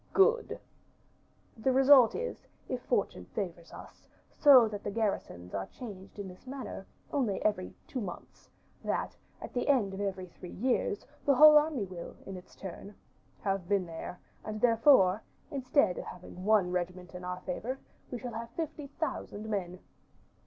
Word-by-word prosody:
"Good." 460 +4 +3 1.0
"The 230 +4 +1
result 265 -2 +7
is, 485 +2 -5 0.2
if 255 -1 -3
Fortune 200 - -1
favors 175 -4 -4
us, - - -12 0.3
so 265 -6 +8
that 210 -1 -6
the - - -2
garrisons 200 - -2
are 95 -1 -2
changed 200 -6 -10
in 200 -1 -5
this 185 +7 -13
manner, 260 -7 -6 0.3
only 240 -9 +1
every 205 -4 0
two 255 - -4
months, 180 -4 -8 0.3
that, - - -1 0.3
at - - -8
the 245 - -1
end 240 -9 +3
of 195 - -4
every 190 -2 -2
three 180 0 -11
years, 235 -2 0 0.2
the 280 - +4
whole 305 +2 +10
army 300 -7 +3
will, 180 -2 -8
in 195 - -6
its 180 0 -12
turn, 195 +2 -8 0.5
have 195 -3 -1
been 200 -3 +2
there; 170 +1 -7 0.2
and, 215 0 -5
therefore, 230 -4 +5 0.3
instead 260 - +2
of - - -6
having 180 +1 -9
one 205 -4 +4
regiment 180 0 -3
in 180 0 -8
our 180 0 -4
favor, 230 +9 -3 0.3
we 250 - -4
shall 240 0 -6
have 230 +1 -5
fifty 310 -3 -4
thousand 270 -7 -4
men." 185 -4 -2
210 Hz, 160 wpm, -31 LUFS, 185-260 Hz, 1.0 s, whole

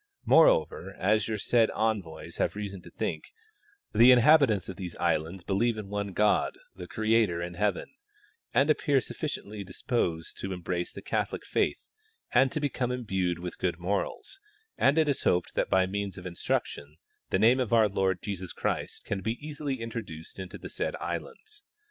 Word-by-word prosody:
Moreover, 95 - +4
as 105 +2 +2
your 110 -1 -2
said 115 +2 +3
envoys 105 -7 -2
have - - 0
reason 100 -2 -5
to - - -13
think, - - -3 0.7
the 120 +2 +7
inhal) 135 +6 +8
itants 110 - +1
of 95 - -6
these 90 -3 -7
islands 85 +4 -1
believe 110 +5 +1
in 105 -2 -6
one 100 0 -3
God 105 +1 +2 0.2
the 90 -1 -9
Creator, 110 -5 +2
in 85 +1 -4
heaven, 100 +1 0 0.6
and 145 +3 +4
appear 145 -2 +2
sufficiently 105 -3 -5
disposed 90 -4 -2
to 95 -1 -3
embrace 90 0 -3
the - - -9
Catholic - - -2
faith - - -1 0.4
and 130 +1 +5
to - - -2
become 130 -4 -1
imbued 95 -8 -1
with 90 0 -7
good 90 -3 0
morals, 100 - -3 0.4
and 140 +4 +3
it 160 -1 +4
is 140 - 0
hoped 90 - +1
that - - 0
by 95 0 +4
means 100 +1 -3
of 90 - -9
instruction 75 -4 -3 0.3
the - - +2
name 115 +6 +5
of 125 -3 -1
our 115 -2 +5
Lord 95 -2 0
Jesus 95 -3 -5
Christ - - -3
can 100 -1 -2
easily 145 +4 -3
be 115 - -7
introduced 100 -9 -7
into 95 -1 -7
the - - -9
said - - -2
islands. 430 -1 -6
100 Hz, 175 wpm, -28 LUFS, 90-120 Hz, 0.7 s, inhal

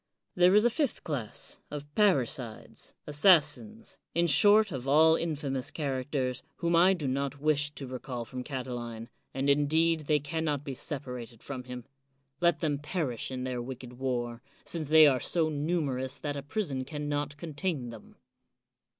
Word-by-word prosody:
There 180 +2 +5
is 210 +2 +5
a 240 - +4
fifth 285 +1 -1
class, 130 -9 -4
of 145 -1 -6
parricides, 135 - -1
assassins, 175 +8 +2 0.2
in 170 +1 +3
short 205 +7 +6
of 130 -3 -5
all 160 +3 +6
infamous 145 -6 -2
characters, 130 -3 -2
whom 170 -1 0
I 180 +3 +6
do 155 -6 -4
not 140 +2 -2
wish 145 -1 +1
to 140 - -6
recall 125 -1 -5
from 125 +1 -6
Catiline, 120 -4 -5 0.2
and 135 +1 -2
indeed 155 +2 +2
they 150 -1 +3
can 160 +3 -3
not 145 -3 -1
be 140 - -5
separated 125 -4 -5
from 130 -3 -6
him. 125 -1 -8 0.5
Let 170 -3 +2
them 145 -3 0
perish 145 -6 -2
in 130 -1 -4
their 125 -1 -3
wicked 125 0 -8
war, 120 -3 -2 0.2
since 160 -3 -3
they 155 0 +8
are 135 -3 +4
so 160 +2 +1
numerous 145 -4 -1
that 145 -1 -4
a 140 - -4
prison 145 -3 -2
can 150 +1 -5
not 145 0 -2
contain 150 -4 -3
them. 115 -2 -13
145 Hz, 160 wpm, -29 LUFS, 130-160 Hz, 0.5 s, they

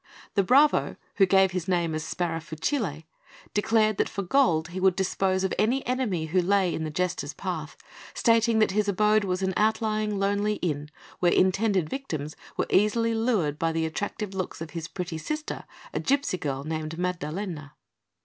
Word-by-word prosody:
The 200 - +3
bravo, 275 +10 +4 0.2
who 195 - +5
gave 190 0 +4
his 180 -1 -3
name 170 -3 +1
as 155 0 -2
Sparafucile, 165 - -2 0.5
declared 215 0 +2
that - - +1
for 200 - -4
gold 175 - +2
he 180 +2 -5
would 190 -1 +3
dispose 190 0 0
of 190 - 0
any 245 +6 +2
enemy 240 -10 -1
who 180 +4 +2
lay 190 -1 +2
in 160 - -3
the 155 - -3
Jester's 180 +3 -2
path, - - -5 0.4
stating 230 -1 +3
that 215 -3 +3
his 210 +1 +1
abode 210 +2 +3
was 185 -1 -1
an 190 0 0
outlying, 215 -1 +1
lonely 205 +2 +1
inn, 150 -5 -3 0.3
where 175 -1 +3
intended 190 -2 +2
victims 155 - -5 0.2
were - - +1
easily 230 +3 +3
lured 215 - 0
by 165 0 +1
the 165 0 0
attractive 200 +5 -4
looks 185 -2 -4
of 160 -1 -7
his 165 -1 -5
pretty 175 -3 -5
sister, 305 - -4 0.3
a - - -1
gipsy 275 -9 0
girl 140 -3 -3
named 155 +1 -4
Maddalena. 170 -3 -4
190 Hz, 170 wpm, -26 LUFS, 165-215 Hz, 0.5 s, who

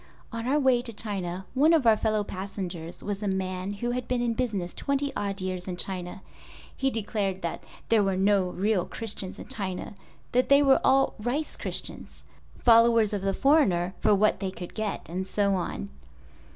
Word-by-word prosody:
On 230 +1 -4
our 280 +3 +3
way 260 -3 +3
to 240 - -4
China 190 -4 -3
one 295 +6 +4
of 310 -6 +3
our 225 -1 +7
fellow 215 -1 0
passengers 185 -4 -6
was 205 0 -3
a 210 - -2
man 190 0 -2
who 240 +4 -2
had 250 0 -3
been 250 -1 0
in 240 -1 0
business 210 -8 -2
twenty 280 0 -1
odd 200 -1 -2
years 185 -1 -3
in 180 -1 -4
China. 185 0 -4 0.5
He 270 - +1
declared 205 -5 -2 0.4
there 225 -2 +5
were 195 -2 +1
no 195 -1 +3
real 195 0 0
Christians 200 -4 -6
in - - -9
China, 190 -3 -4 0.4
that 250 +1 +2
they 280 +1 +6
were 270 -1 +5
all 270 0 +4
"rice" 260 +8 -2
Christians—followers 230 -2 +1
of 205 - -1
the 195 0 0
foreigner 195 - +3
for 210 - +4
what 210 0 +2
they 190 -1 -2
could 180 -2 -8
get 215 -2 -3
and 185 +3 -4
so 200 +1 +1
on. 65 - -3
205 Hz, 180 wpm, -27 LUFS, 185-240 Hz, 0.5 s, our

